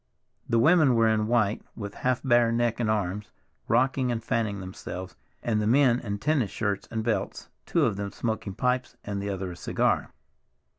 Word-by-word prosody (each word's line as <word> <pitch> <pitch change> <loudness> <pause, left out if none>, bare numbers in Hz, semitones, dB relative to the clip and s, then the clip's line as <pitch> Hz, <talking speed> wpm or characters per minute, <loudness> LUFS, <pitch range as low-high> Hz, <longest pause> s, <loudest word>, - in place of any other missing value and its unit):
The 115 - +3
women 150 +1 +5
were 115 -1 +4
in 110 -1 +2
white, 115 -2 +2
with 100 -2 -6
half 125 -1 -1
bare 120 -3 +4
neck 115 0 0
and 115 -3 0
arms, 105 -1 -1 0.4
rocking 130 +1 +2
and 115 -1 -3
fanning 110 -4 -1
themselves, 95 -2 -7 0.3
and 110 -2 +1
the 105 - 0
men 125 0 +4
in 100 -4 -4
tennis 135 -2 +1
shirts 100 -1 -2
and 110 -1 -3
belts, 115 -1 -2 0.2
two - - +2
of 100 - 0
them 100 -1 -4
smoking 110 -4 -3
pipes, 125 +2 -1
and 100 -1 -4
the 100 - -3
other 95 -2 -3
a - - -8
cigar. - - 0
110 Hz, 185 wpm, -27 LUFS, 100-120 Hz, 0.4 s, women